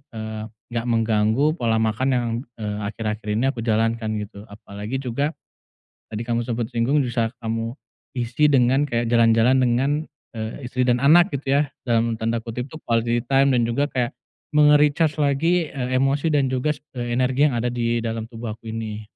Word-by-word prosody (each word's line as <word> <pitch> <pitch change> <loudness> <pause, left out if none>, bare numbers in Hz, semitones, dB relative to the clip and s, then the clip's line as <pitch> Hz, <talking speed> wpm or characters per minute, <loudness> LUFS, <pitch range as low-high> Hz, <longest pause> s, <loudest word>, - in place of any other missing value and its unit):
eee, 110 -1 -5 0.3
nggak 115 +1 -2
mengganggu 110 +2 +2
pola 115 -1 +1
makan 110 +4 0
yang, 120 -1 0 0.3
eee, 105 -1 -3
akhir-akhir 110 -1 -4
ini 125 - +1
aku 120 -4 -6
jalankan, 115 0 0
gitu. 105 0 -8
Apalagi 105 +3 -6
juga 140 +4 -1 0.8
tadi 110 - -3
kamu 120 0 0
sempet 120 -1 -2
singgung, 125 +6 +2
bisa 120 -2 -1
kamu 115 +1 -3 0.4
isi 120 +5 +1
dengan 130 0 +4
kayak 120 -2 0
jalan-jalan 115 +2 +4
dengan, 125 +3 +2 0.4
eee, 110 +4 -5
istri 125 +1 -1
dan 125 +1 +2
anak, 175 +6 +6
gitu 135 0 -3
ya, - - +4 0.2
dalam 115 -1 +2
tanda 115 +1 0
kutip 120 +1 -5
tuh 155 - -9
"quality 115 0 +1
time" 135 0 +4
dan 120 - +3
juga 130 +5 0
kayak 125 -2 -1 0.4
me-recharge 150 +1 +4
lagi, 155 +4 +1
eee, 130 -2 -3
emosi 135 +3 +1
dan 145 -2 +2
juga 130 +3 0
s - - -17
eee, 120 -1 -3
energi 130 +3 +3
yang 125 - -3
ada 120 +1 0
di 120 -1 0
dalam 115 -1 -3
tubuh 115 -1 -6
aku 115 0 -10
ini. 110 -1 -5
120 Hz, 175 wpm, -23 LUFS, 115-135 Hz, 0.8 s, anak